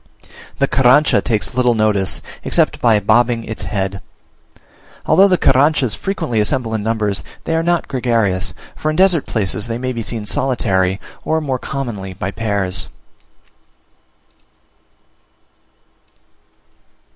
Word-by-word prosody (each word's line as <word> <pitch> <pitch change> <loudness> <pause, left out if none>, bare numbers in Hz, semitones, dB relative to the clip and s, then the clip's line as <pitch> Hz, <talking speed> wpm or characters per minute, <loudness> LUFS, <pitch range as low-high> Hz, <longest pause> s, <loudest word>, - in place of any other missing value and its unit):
The 140 - +2
Carrancha 135 +4 +4
takes 110 +1 -2
little 125 -1 +2
notice, 105 -3 +1 0.2
except - - +1
by 115 -3 +4
bobbing 115 +2 +2
its 110 - -4
head. 95 -1 -3 1.0
Although 195 +1 +5
the 185 -2 +2
Carranchas 135 -5 +3
frequently 160 - -2
assemble 115 +1 +1
in 110 - -1
numbers, 105 -2 0 0.2
they 165 - -1
are 165 - +1
not 170 +1 0
gregarious; 115 -8 0 0.2
for 155 - -2
in 155 - -1
desert 180 -4 +3
places 105 0 -1
they 115 0 -3
may 130 +1 -3
be 115 - -4
seen 110 -1 -3
solitary, 100 -7 0 0.2
or 160 0 0
more 135 -4 -2
commonly 115 -10 -5
by 95 +1 -4
pairs. 100 -5 -2
115 Hz, 120 wpm, -17 LUFS, 105-135 Hz, 1.0 s, Although